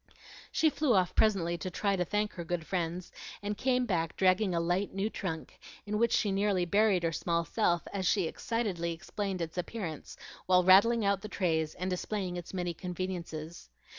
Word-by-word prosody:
She 315 -1 +3
flew 290 -7 +2
off 185 -2 +2
presently 175 -6 +2
to 185 - -4
try 200 +2 0
to 180 - +1
thank 210 +3 -1
her 175 - -6
good 170 -1 -3
friends, 175 0 -3 0.3
and 205 +1 -2
came 250 +2 +1
back 165 -7 -1
dragging 185 0 +3
a - - +2
light 175 +4 0
new 200 +3 -1
trunk, 160 -5 -5 0.3
in 210 +1 -2
which 235 0 +3
she 205 - +2
nearly 195 -2 +1
buried 200 0 +3
her 165 - +1
small 170 +1 0
self 175 -6 +1
as 190 -2 -1
she 195 0 +3
excitedly 180 -3 -2
explained 190 +1 -3
its 165 +2 -5
appearance, 175 -4 -5 0.3
while 180 0 +5
rattling 205 +5 +6
out 200 -1 +2
the 215 - -6
trays 160 -5 0
and 180 - -3
displaying 185 0 -2
its 175 -1 -6
many 180 -2 -2
conveniences. 175 - -5
185 Hz, 185 wpm, -31 LUFS, 170-205 Hz, 0.3 s, rattling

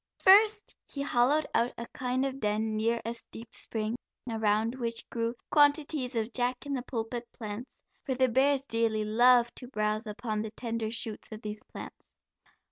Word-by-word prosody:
First 420 +2 +6 0.2
he 280 - -3
hollowed 280 +4 +3
out 235 +1 +2
a 235 - -5
kind 255 +1 0
of 270 0 -3
den 215 0 0
near 230 +2 +1
a 230 - -2 0.2
deep 225 0 -10
spring, 220 +1 -3 0.3
around 220 0 +1
which 235 -3 -3
grew 230 0 -1 0.2
quantities 290 -3 +3
of 225 +1 -1
jack 250 +1 0
in 285 - -3
the 260 - -1
pulpit 235 -1 -4
plants, 220 +2 -7 0.2
for 260 - -2
the 260 0 +4
bears 270 +3 +3
dearly 225 -3 +1
love 240 +2 +5
to 250 - -5
browse 215 -2 -1
upon 215 0 -3
the 220 - -4
tender 230 -1 -3
shoots 225 -1 -4
of 215 0 -8
these 210 0 -5
plants. - - -11
235 Hz, 170 wpm, -30 LUFS, 220-260 Hz, 0.3 s, First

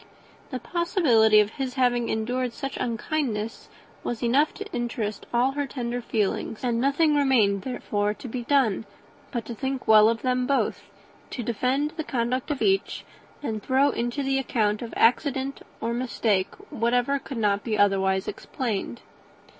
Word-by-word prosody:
The 255 - -3
possibility 285 - +3
of 210 0 -1
his 265 -1 -4
having 245 -2 +2
really - - -1
endured 245 +3 -1
such 275 +1 -5
unkindness 230 -2 -2 0.3
was 240 0 -3
enough 270 +6 +3
to 415 - -6
interest 225 -3 -3
all 245 +3 +3
her 285 0 -2
tender 245 -2 -3
feelings; 220 0 -2
and 235 -2 +1
nothing 290 +3 +3
therefore 230 -5 +1
remained 210 - -2
to - - -7
be 245 +1 -4
done 240 -5 +1 0.4
but 235 -3 -3
to 235 - -5
think 265 +2 -4
well 215 0 +7
of 230 0 -2
them 250 -1 +1
both, 280 - +1 0.5
to 245 - -4
defend 255 +6 0
the 315 - -2
conduct 250 0 -1
of 290 -3 -1
each, 390 -1 +1 0.4
and 220 -6 -3
throw 270 +5 +3
into 240 +4 -2
the 270 0 +1
account 215 -5 0
of 235 - -6
accident 270 +2 +2 0.2
or 230 +1 -2
mistake 230 -5 0 0.2
whatever 245 +2 +1
could 270 -1 -7
not 205 -2 +1
be 220 -3 -1
otherwise 190 -1 +2
explained. 235 -1 -4
245 Hz, 160 wpm, -26 LUFS, 220-270 Hz, 0.5 s, well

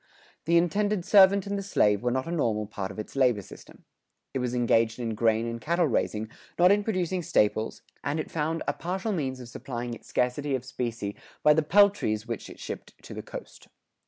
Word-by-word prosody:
The 170 +2 +4
indented 200 +2 +1
servant 200 -1 +6
and 200 0 -2
the - - -3
slave 105 - +2
were 125 - +1
not 130 +2 -1
a 165 - -5
normal 115 -10 0
part 100 -2 -5
of 100 - -10
its 110 - -7
labor 125 -7 +3
system. - - -14 0.5
It 135 - -1
was 125 -1 -2
engaged 115 -2 +2
in 115 -2 -3
grain 110 +1 +2
and 115 0 -4
cattle 170 +6 +2
raising, 110 -5 -1 0.3
not 180 +2 +6
in 205 0 +3
producing 185 -4 -1
staples, 110 -7 +1 0.2
and 150 +3 -1
it 155 - -4
found 160 +1 -1
a 145 - +1
partial 190 +7 -3
means 135 -8 -2
of 125 - -9
supplying 120 0 -5
its - - -11
scarcity 135 +3 0
of 130 -1 -5
specie 115 -5 -4 0.3
by 150 - +7
the 160 - +3
peltries 170 - +3
which 115 -4 -5
it - - -12
shipped - - -7
to - - -9
the - - -5
coast. - - -10
130 Hz, 205 wpm, -27 LUFS, 115-175 Hz, 0.5 s, by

